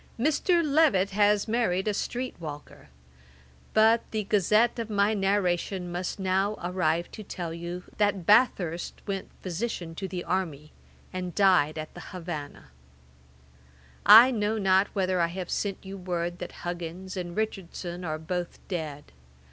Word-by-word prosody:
Mr. 325 +6 +2
Levet 275 -11 +3
has 205 +1 +3
married 215 -4 0
a 210 - +2
street 250 +5 -3
walker. 145 - -9 0.9
But 225 +1 +5
the 215 -1 -2
gazette 210 +4 +2
of 225 -1 -4
my 205 0 +2
narration 190 -2 0
must 175 +1 -3
now 195 +2 +1
arrive 175 -2 0
to - - -8
tell 175 -4 -5
you, 170 +2 -6 0.2
that 205 -4 +1
Bathurst 190 -6 +2
went 195 -2 -4
physician 180 -2 -4
to 190 +3 -5
the 180 -1 -5
army, 155 -5 -3 0.4
and 180 -1 -4
died 180 -7 +4
at 155 0 -6
the - - -10
Havannah. 165 - -7 1.4
'I 235 +5 +10
know 215 -2 0
not 190 -1 +3
whether 185 -2 +1
I 170 - +3
have 180 +1 -6
not - - -5
sent 200 -2 -1
you 195 +1 -7
word 175 -1 -3
that 180 - -6
Huggins 175 +2 -5
and 175 -1 -5
Richardson 185 -4 -4
are 155 -2 -2
both 175 +2 -4
dead. 155 -6 -5
185 Hz, 150 wpm, -27 LUFS, 175-210 Hz, 1.4 s, I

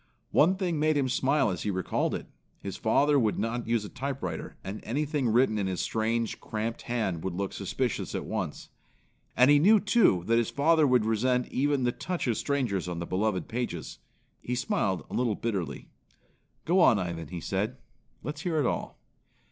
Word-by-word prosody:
One 175 +6 +4
thing 180 -5 -1
made 155 0 +2
him 135 -2 +1
smile 130 -2 +2
as 90 - -4
he - - -2
recalled 95 -2 -1
it. - - -5 0.3
His 100 - -6
father 140 +6 +3
would 110 -4 +1
not 115 +1 -2
use 115 -2 +1
a - - -5
typewriter, 130 - -5
and 95 +3 -5
anything 145 0 -1
written 110 -1 +3
in 100 - 0
his 95 -2 -2
strange, 115 0 -1
cramped 110 +1 -4
hand 110 -9 -2
would 95 -2 -3
look 100 +1 -3
suspicions - - -2
at - - -3
once. - - -4 0.7
And 125 +3 +6
he 145 - +6
knew, 210 +7 +6
too, 190 - +3
that 115 +2 +3
his 115 - 0
father 155 +1 +3
would 125 -4 +3
resent 125 +3 +1
even 140 0 +1
the 120 - +2
touch 180 +7 -3
of 120 -3 +1
strangers 120 -11 -1
on 90 -1 -4
the 85 - -3
beloved 95 +2 -1
pages. 115 -9 -4 0.4
He 125 - -3
smiled 100 -6 -1
a - - -11
little 120 -4 +1
bitterly. 100 -7 -3 0.8
"Go 180 +3 +3
on, 125 - +6
Ivan," 85 -4 -4
he 90 +1 -6
said. 105 +9 -2 0.5
"Let's 150 0 -5
hear 175 -4 -1
it 145 - +2
all." - - -2
120 Hz, 190 wpm, -28 LUFS, 100-140 Hz, 0.8 s, And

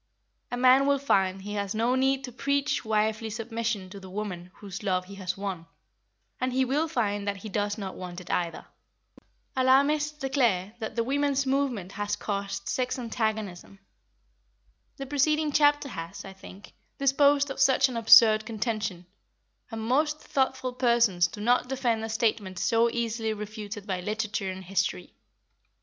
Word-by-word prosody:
A 245 - -3
man 255 +2 +5
will 280 0 +4
find 195 -8 +1
he 205 +1 -5
has 200 0 -2
no 230 +3 +2
need 265 +1 +1
to 255 - -6
preach 280 +3 0
wifely 220 0 0
submission 225 -2 -3
to 200 - -8
the 190 -1 -11
woman 185 -3 -5
whose 195 -2 -8
love 185 -3 0
he 200 - -11
has 190 -2 -4
won, 190 -4 -5 0.7
and 255 0 0
he 260 +1 +2
will 290 +5 0
find 205 -9 -1
that 200 -1 -1
he 215 +3 -8
does 205 +1 -1
not 195 -3 -5
want 180 -1 -7
it 180 - -8
either. 170 -2 -2 0.9
Alarmists 285 +4 +3
declare 240 -9 0
that 220 -1 -5
the 230 - +1
women's 280 +2 +1
movement 260 -9 -1
has 205 0 -2
caused 200 -1 -4
sex 255 0 -1
antagonism. 220 -6 -3 1.2
The 275 - -5
preceding 300 +2 +1
chapter 290 -1 +3
has, 165 -6 -7
I 195 - -9
think, 190 +1 -13 0.2
disposed 280 +1 +3
of - - -6
such 270 -1 +5
an 255 - -6
absurd 225 -1 +7
contention, 215 -4 -3 0.6
and 225 -2 -5
most 300 +6 +1
thoughtful 260 -1 -1
persons 235 -8 +3
do 205 +5 -9
not 245 +3 +2
defend 245 -4 0
a 225 - -4
statement 215 -4 -1
so 230 +5 +2
easily 230 -1 -2
refuted 210 -1 -7
by 190 -3 -3
literature 215 0 -2
and 190 0 -6
history. 185 - -2
225 Hz, 160 wpm, -27 LUFS, 200-260 Hz, 1.2 s, absurd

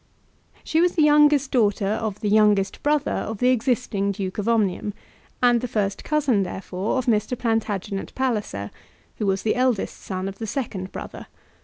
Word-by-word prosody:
She 320 - +1
was 355 0 +3
the 315 - +4
youngest 295 -2 +5
daughter 210 -4 +2
of 210 0 -2
the 210 - -1
youngest 205 -2 +3
brother 295 -1 +1
of 220 - -3
the 250 +4 +3
existing 240 -5 0
Duke 190 0 -4
of 205 +3 -1
Omnium, 210 -2 0 0.5
and 240 -1 +4
the 250 - -2
first 205 -4 -2
cousin, 285 -9 +1
therefore, 190 +3 -3
of 255 - -1
Mr. 230 +1 +1
Plantagenet 215 -4 -2
Palliser, 210 - -2 0.5
who 210 - -1
was 195 0 0
the 220 - +2
eldest 250 -4 0
son 185 0 -4
of 195 0 -7
the 225 - -4
second 200 -8 -4
brother. - - -8
220 Hz, 170 wpm, -23 LUFS, 195-255 Hz, 0.5 s, youngest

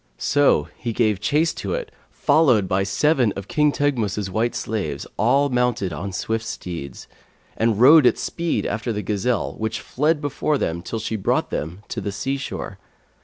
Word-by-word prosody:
So 140 - +3
he 120 -2 -3
gave 110 -4 +1
chase 150 +10 +1
to - - -3
it, - - -5 0.2
followed 140 -10 +3
by 95 +1 +1
seven 120 +4 +2
of 100 0 -7
King 150 -3 +2
Teghmus's 110 -9 -1
white 115 +5 0
slaves 80 -11 -3
all 135 +6 +3
mounted 125 -7 0
on 95 +7 -5
swift 110 +4 -2
steeds, 85 - -7 0.5
and 115 -2 +1
rode 140 +2 +8
at - - +3
speed 170 - -2
after 110 +3 -2
the 105 -1 -3
gazelle, 105 +1 -1
which 110 +1 -2
fled 150 +4 0
before 145 +1 -1
them 85 -8 -2
till 115 - -5
she 110 0 -3
brought 95 - 0
them 85 +7 -4
to - - -4
the 100 - -3
sea 130 +8 -2
shore. 135 - -6
115 Hz, 170 wpm, -22 LUFS, 100-140 Hz, 0.5 s, rode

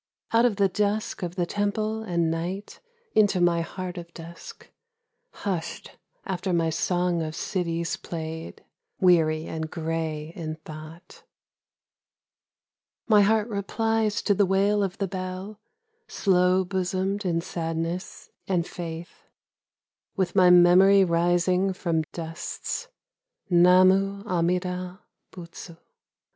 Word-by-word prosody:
Out 230 +1 +4
of 235 -4 +2
the 200 -1 +3
dusk 210 +2 -1
of 175 -1 -4
the 180 -2 0
temple 215 +3 -1
and 170 -6 0
night 180 +5 -4 0.3
Into 205 -3 +3
my 175 -1 +3
heart 180 +1 -6
of 170 0 -11
dusk, 170 +1 -11 0.6
Hushed 180 - -5 0.3
after 190 -1 -2
my 165 -1 +1
song 175 +1 0
of 155 0 -4
cities 170 -3 -2
played, 160 -1 -7 0.3
Weary 160 -4 +3
and 160 -1 -4
grey 160 -1 -3
in 155 -2 -5
thought. 155 +3 -11 1.9
My 210 -3 +6
heart 215 +1 +3
replies 220 +1 -1
to 205 - +3
the 200 0 +2
wail 200 +2 +2
of 195 -2 -2
the 195 - -1
bell, 185 +2 -6 0.5
Slow 185 -1 +2
bosomed 190 +2 -1
in 170 -3 0
sadness 165 +1 -4 0.2
and 175 -3 +1
faith, 170 -2 -8 0.9
With 190 -2 -1
my 185 -2 +6
memory 180 +3 +7
rising 175 +2 +2
from 170 -3 -1
dusts, 165 - -5 0.6
Namu 185 +3 +5
amida 180 0 -1 0.3
butsu 170 -1 -11
180 Hz, 115 wpm, -26 LUFS, 170-195 Hz, 1.9 s, memory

